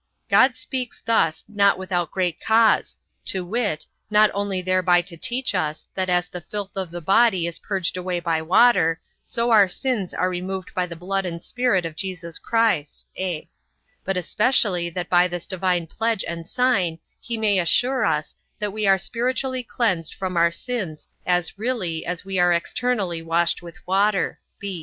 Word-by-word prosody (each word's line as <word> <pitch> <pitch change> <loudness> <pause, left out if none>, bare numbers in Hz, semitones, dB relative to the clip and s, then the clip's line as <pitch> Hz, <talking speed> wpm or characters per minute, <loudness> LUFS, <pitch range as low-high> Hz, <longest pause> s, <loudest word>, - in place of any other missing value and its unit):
God 260 -1 +6
speaks 255 -3 -4
thus 165 -9 +2
not 200 -2 +3
without 180 -3 -2
great 180 -3 -1
cause, 225 0 +3 0.3
to 185 -2 -1
wit, 205 -5 -1 0.2
not 210 0 +5
only 200 -1 -1
thereby 185 -1 +3
to 175 -1 -6
teach 245 +6 -1
us, 155 -5 -2
that 185 -1 -1
as 180 0 +2
the 180 - -7
filth 200 +2 -6
of 190 -3 -3
the 175 +1 -7
body 195 0 +3
is 170 -1 -5
purged 190 -4 -2
away 180 -1 -2
by 165 -2 0
water, 165 -2 +4 0.2
so 235 +1 -1
our 210 -3 +7
sins 205 0 -1
are 180 - 0
removed 185 +1 -4
by 180 -1 0
the 170 - -7
blood 195 +3 -2
and 170 -2 -5
Spirit 245 -8 +1
of 165 -2 -5
Jesus 175 -3 -5
Christ; 225 -11 0
(a) 180 -4 -3 0.6
but 195 0 -1
especially 180 -2 +1
that 175 +1 -4
by 180 0 +4
this 175 -1 -5
divine 180 -2 0
pledge 225 +5 -1
and 170 -1 -5
sign 200 -9 +1 0.2
he 235 -1 -3
may 210 -3 +2
assure 250 +9 +3
us, 150 0 0 0.2
that 210 -2 -3
we 215 -1 -1
are 195 0 +6
spiritually 255 +5 -1
cleansed 210 -9 -1
from 185 -2 -4
our 170 0 +4
sins 180 -4 -4 0.2
as 180 +1 0
really, 210 -10 -2
as 180 +2 -4
we 195 -1 -2
are 175 0 +4
externally 185 0 -1
washed 170 +1 +1
with 170 +1 -11
water. 195 +1 +1
185 Hz, 170 wpm, -23 LUFS, 175-215 Hz, 0.6 s, our